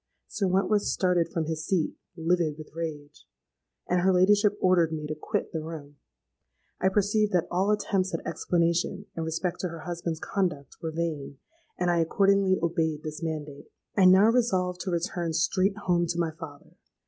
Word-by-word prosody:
'—Sir 200 Hz, -, -1 dB
Wentworth 195 Hz, +3 st, +2 dB
started 180 Hz, -4 st, +1 dB
from 165 Hz, -2 st, -2 dB
his 160 Hz, 0 st, -3 dB
seat, 180 Hz, -3 st, 0 dB, 0.2 s
livid 165 Hz, -2 st, +1 dB
with 155 Hz, -1 st, -11 dB
rage; 150 Hz, -3 st, -6 dB, 0.6 s
and 180 Hz, 0 st, +2 dB
her 190 Hz, +1 st, +4 dB
ladyship 205 Hz, +3 st, +4 dB
ordered 180 Hz, -3 st, +3 dB
me 155 Hz, -1 st, -4 dB
to 150 Hz, -, -3 dB
quit 200 Hz, +7 st, -3 dB
the 160 Hz, -, -2 dB
room. 150 Hz, -3 st, -8 dB, 0.8 s
I 190 Hz, -, +3 dB
perceived 205 Hz, +2 st, +1 dB
that 175 Hz, -1 st, +2 dB
all 190 Hz, +3 st, +1 dB
attempts 195 Hz, -3 st, +1 dB
at 165 Hz, -, -4 dB
explanation 170 Hz, +3 st, 0 dB
in 165 Hz, -, -3 dB
respect 165 Hz, +2 st, -2 dB
to 180 Hz, -, -2 dB
her 165 Hz, -1 st, -8 dB
husband's 170 Hz, -2 st, -4 dB
conduct 160 Hz, -10 st, -2 dB
were 160 Hz, -, -3 dB
vain; 155 Hz, -4 st, -3 dB, 0.4 s
and 180 Hz, -1 st, +1 dB
I 170 Hz, -, +2 dB
accordingly 195 Hz, +3 st, +3 dB
obeyed 160 Hz, -2 st, 0 dB
this 155 Hz, +1 st, -6 dB
mandate. 150 Hz, -3 st, -5 dB, 0.3 s
"I 195 Hz, -, +5 dB
now 190 Hz, +4 st, +7 dB
resolved 185 Hz, -7 st, +1 dB
to 190 Hz, -, -3 dB
return 170 Hz, -1 st, -2 dB
straight 185 Hz, +5 st, +1 dB
home 175 Hz, -4 st, +1 dB
to 170 Hz, +1 st, -2 dB
my 165 Hz, -2 st, 0 dB
father. 155 Hz, -3 st, -11 dB
170 Hz, 170 wpm, -27 LUFS, 160-190 Hz, 0.8 s, now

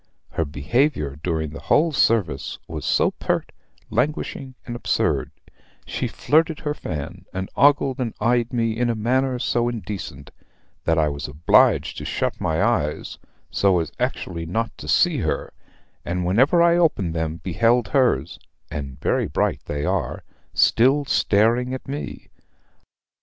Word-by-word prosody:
Her 80 Hz, -, -1 dB
behavior 75 Hz, -, 0 dB
during 80 Hz, -3 st, -2 dB
the -, -, -8 dB
whole 160 Hz, +2 st, +3 dB
service 105 Hz, -, +1 dB
was -, -, -6 dB
so -, -, +3 dB
pert, -, -, -2 dB, 0.4 s
languishing, 130 Hz, +1 st, -2 dB
and 120 Hz, -, -5 dB
absurd; 120 Hz, -, 0 dB, 0.6 s
she -, -, -2 dB
flirted 160 Hz, +1 st, +1 dB
her 150 Hz, -1 st, -1 dB
fan, 85 Hz, -, -6 dB
and 95 Hz, 0 st, -4 dB
ogled 140 Hz, -2 st, +3 dB
and 120 Hz, -4 st, -2 dB
eyed 120 Hz, 0 st, +1 dB
me 115 Hz, -3 st, 0 dB
in 120 Hz, +1 st, 0 dB
a 115 Hz, -, 0 dB
manner 130 Hz, +4 st, +1 dB
so 120 Hz, -1 st, 0 dB
indecent, 100 Hz, -, -6 dB, 0.5 s
that 80 Hz, 0 st, +2 dB
I 80 Hz, -1 st, +3 dB
was 70 Hz, -1 st, -5 dB
obliged 75 Hz, +3 st, +3 dB
to -, -, -7 dB
shut -, -, -2 dB
my 80 Hz, +4 st, +1 dB
eyes, 95 Hz, -11 st, -1 dB, 0.3 s
so 95 Hz, -3 st, +3 dB
as 80 Hz, -3 st, -3 dB
actually 85 Hz, -2 st, -3 dB
not 115 Hz, +6 st, -2 dB
to -, -, -8 dB
see -, -, +3 dB
her, -, -, -2 dB, 0.5 s
and 90 Hz, +1 st, -2 dB
whenever 130 Hz, -, +4 dB
I 170 Hz, 0 st, +5 dB
opened 105 Hz, -, +2 dB
them 80 Hz, -1 st, -2 dB
beheld 110 Hz, +6 st, +1 dB
hers 100 Hz, -, +1 dB, 0.3 s
(and 70 Hz, -2 st, -6 dB
very -, -, +1 dB
bright -, -, 0 dB
they 75 Hz, 0 st, -3 dB
are) -, -, -1 dB, 0.3 s
still 135 Hz, +5 st, +4 dB
staring 120 Hz, +2 st, +2 dB
at 130 Hz, -, -9 dB
me. 140 Hz, +2 st, -6 dB
110 Hz, 145 wpm, -23 LUFS, 80-130 Hz, 0.6 s, I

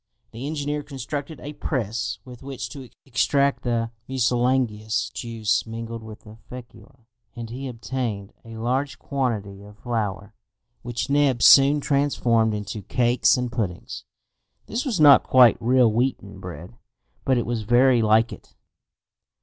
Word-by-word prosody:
The 120 Hz, +5 st, -6 dB
engineer 150 Hz, -1 st, -3 dB
constructed 140 Hz, +1 st, -6 dB
a 145 Hz, -, -7 dB
press, 115 Hz, -5 st, -3 dB
with 125 Hz, -2 st, -12 dB
which 135 Hz, -2 st, -6 dB
to 130 Hz, -3 st, -10 dB, 0.2 s
extract 140 Hz, +1 st, +1 dB
the 115 Hz, -2 st, -1 dB, 0.2 s
mucilaginous 120 Hz, -3 st, 0 dB
juice 115 Hz, -2 st, -2 dB
mingled 115 Hz, 0 st, -6 dB
with 110 Hz, -1 st, -11 dB
the 110 Hz, +1 st, -14 dB
fecula, 120 Hz, 0 st, -13 dB, 0.3 s
and 115 Hz, -1 st, -7 dB
he 135 Hz, +3 st, -6 dB
obtained 115 Hz, -4 st, -4 dB
a 115 Hz, -1 st, -10 dB
large 130 Hz, +5 st, -1 dB
quantity 110 Hz, -8 st, -3 dB
of 105 Hz, +1 st, -14 dB
flour, 105 Hz, -4 st, -3 dB, 0.5 s
which 120 Hz, +2 st, -4 dB
Neb 140 Hz, -4 st, +2 dB
soon 140 Hz, +2 st, +7 dB
transformed 120 Hz, -6 st, +1 dB
into 105 Hz, 0 st, -5 dB
cakes 120 Hz, +5 st, +2 dB
and 125 Hz, -1 st, -3 dB
puddings. 100 Hz, -8 st, -4 dB, 0.6 s
This 235 Hz, +6 st, -3 dB
was 235 Hz, -, -1 dB
not 145 Hz, -3 st, +8 dB
quite 125 Hz, -3 st, +5 dB
real 125 Hz, -1 st, +4 dB
wheaten 125 Hz, +3 st, -2 dB
bread, 85 Hz, +9 st, -9 dB, 0.5 s
but 130 Hz, -1 st, +2 dB
it 120 Hz, -, 0 dB
was 120 Hz, -1 st, -2 dB
very 120 Hz, +3 st, +4 dB
like 110 Hz, +1 st, +3 dB
it. -, -, -15 dB
120 Hz, 140 wpm, -23 LUFS, 110-135 Hz, 0.6 s, not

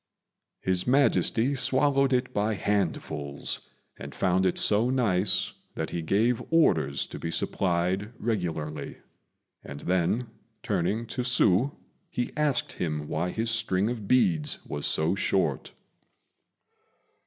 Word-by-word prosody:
His 95 Hz, +2 st, 0 dB
Majesty 135 Hz, -1 st, +3 dB
swallowed 135 Hz, +1 st, +2 dB
it 125 Hz, 0 st, 0 dB
by 105 Hz, +1 st, 0 dB
handfuls, 80 Hz, -8 st, -2 dB, 0.3 s
and -, -, -8 dB
found 95 Hz, 0 st, +2 dB
it 90 Hz, -, 0 dB
so 110 Hz, +4 st, +3 dB
nice 105 Hz, -7 st, +1 dB, 0.2 s
that -, -, -3 dB
he 85 Hz, -, -2 dB
gave 110 Hz, +8 st, +1 dB
orders 85 Hz, -, +2 dB
to -, -, -9 dB
be 80 Hz, -, -4 dB
supplied 90 Hz, +4 st, 0 dB
regularly; 80 Hz, -9 st, -3 dB, 0.7 s
and 70 Hz, -, -8 dB
then, 95 Hz, +7 st, 0 dB, 0.4 s
turning 105 Hz, +4 st, -1 dB
to 115 Hz, -, -4 dB
Hsü, 125 Hz, +1 st, +2 dB, 0.3 s
he 120 Hz, -, -3 dB
asked 150 Hz, -3 st, +1 dB
him 75 Hz, -3 st, -3 dB
why 80 Hz, +4 st, -1 dB
his 115 Hz, +4 st, -1 dB
string 110 Hz, -2 st, +1 dB
of 110 Hz, -5 st, -6 dB
beads 85 Hz, -12 st, +2 dB
was 75 Hz, -1 st, -3 dB
so 80 Hz, +3 st, +2 dB
short. 95 Hz, -7 st, 0 dB
100 Hz, 120 wpm, -27 LUFS, 85-125 Hz, 0.7 s, Majesty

